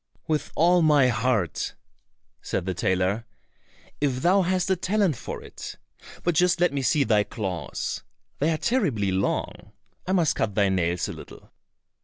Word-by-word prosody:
"With 155 Hz, -2 st, -1 dB
all 175 Hz, +2 st, +4 dB
my 145 Hz, -5 st, +5 dB
heart," 110 Hz, -, 0 dB, 0.7 s
said -, -, -3 dB
the 95 Hz, -, -1 dB
tailor, 95 Hz, +4 st, 0 dB, 0.7 s
"if 130 Hz, -3 st, 0 dB
thou 190 Hz, +3 st, +5 dB
hast 185 Hz, +1 st, 0 dB
a -, -, +4 dB
talent 185 Hz, -2 st, +1 dB
for -, -, -7 dB
it. -, -, -8 dB, 0.5 s
But 175 Hz, -, +2 dB
just 180 Hz, +2 st, +3 dB
let 175 Hz, -4 st, +3 dB
me 140 Hz, -, -1 dB
see 140 Hz, +3 st, +3 dB
thy 105 Hz, -3 st, +3 dB
claws, 95 Hz, -6 st, -4 dB, 0.4 s
they 150 Hz, -, +2 dB
are 160 Hz, -, +1 dB
terribly 155 Hz, -, 0 dB
long, 95 Hz, +1 st, -2 dB, 0.3 s
I 185 Hz, -, +1 dB
must 170 Hz, -5 st, +2 dB
cut 105 Hz, -, -1 dB
thy 100 Hz, -2 st, +3 dB
nails 90 Hz, -2 st, 0 dB
a -, -, -5 dB
little." -, -, -13 dB
140 Hz, 160 wpm, -25 LUFS, -, 0.7 s, my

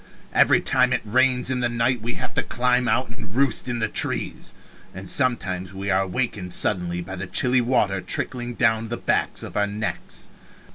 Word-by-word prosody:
Every -, -, +5 dB
time -, -, +2 dB
it -, -, -1 dB
rains 125 Hz, +3 st, +2 dB
in 130 Hz, -, 0 dB
the 120 Hz, -1 st, +1 dB
night 120 Hz, 0 st, 0 dB
we 120 Hz, +2 st, -3 dB
have -, -, -5 dB
to -, -, +1 dB
climb 125 Hz, 0 st, +1 dB
out 125 Hz, +3 st, +1 dB
and 115 Hz, -3 st, -10 dB
roost 135 Hz, -2 st, +2 dB
in 120 Hz, -, -1 dB
the 110 Hz, -, 0 dB
trees -, -, -2 dB, 0.4 s
and 95 Hz, 0 st, -8 dB
sometimes 95 Hz, -5 st, -1 dB
we 100 Hz, +1 st, -3 dB
are 95 Hz, +1 st, +2 dB
wakened 100 Hz, -4 st, -3 dB
suddenly 90 Hz, -3 st, +1 dB
by 95 Hz, +2 st, -7 dB
the 95 Hz, +1 st, -5 dB
chilly 125 Hz, +6 st, +2 dB
water 115 Hz, -6 st, +1 dB
trickling 120 Hz, +3 st, -3 dB
down 115 Hz, -1 st, +2 dB
the 120 Hz, +1 st, -4 dB
back -, -, 0 dB
of -, -, -8 dB
our 105 Hz, 0 st, +2 dB
necks. 105 Hz, -3 st, -5 dB
115 Hz, 190 wpm, -23 LUFS, 95-125 Hz, 0.4 s, Every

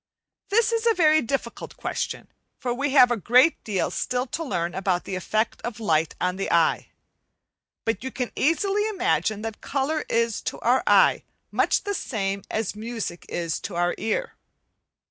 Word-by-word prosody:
This 455 Hz, +3 st, +3 dB
is 460 Hz, 0 st, 0 dB
a 455 Hz, -, +4 dB
very 310 Hz, -2 st, +5 dB
difficult 235 Hz, -1 st, -4 dB
question, -, -, -4 dB, 0.3 s
for 245 Hz, -1 st, -2 dB
we 275 Hz, +4 st, -1 dB
have 255 Hz, -3 st, +6 dB
a -, -, +3 dB
great 250 Hz, -, +4 dB
deal 200 Hz, -4 st, -1 dB
still 250 Hz, 0 st, -1 dB
to 315 Hz, +6 st, -4 dB
learn 175 Hz, -, -2 dB
about 185 Hz, -2 st, 0 dB
the -, -, -6 dB
effect 215 Hz, +5 st, -1 dB
of 235 Hz, -2 st, -5 dB
light 160 Hz, -7 st, +1 dB
on 180 Hz, 0 st, -1 dB
the 195 Hz, -, -2 dB
eye. 170 Hz, -1 st, +2 dB, 1.0 s
But 225 Hz, -1 st, -1 dB
you 260 Hz, -, -3 dB
can 250 Hz, -2 st, -4 dB
easily 390 Hz, +8 st, +1 dB
imagine 360 Hz, -, 0 dB
that 225 Hz, -1 st, -6 dB
colour 290 Hz, +3 st, -1 dB
is 230 Hz, -1 st, +1 dB
to -, -, -10 dB
our -, -, +3 dB
eye -, -, +5 dB, 0.3 s
much -, -, +2 dB
the 410 Hz, -, -2 dB
same 200 Hz, -, -2 dB
as 220 Hz, -2 st, -2 dB
music 220 Hz, -5 st, -5 dB
is 170 Hz, -2 st, -2 dB
to 190 Hz, -, -6 dB
our 175 Hz, 0 st, +1 dB
ear. 225 Hz, -, -2 dB
230 Hz, 170 wpm, -25 LUFS, 195-300 Hz, 1.0 s, have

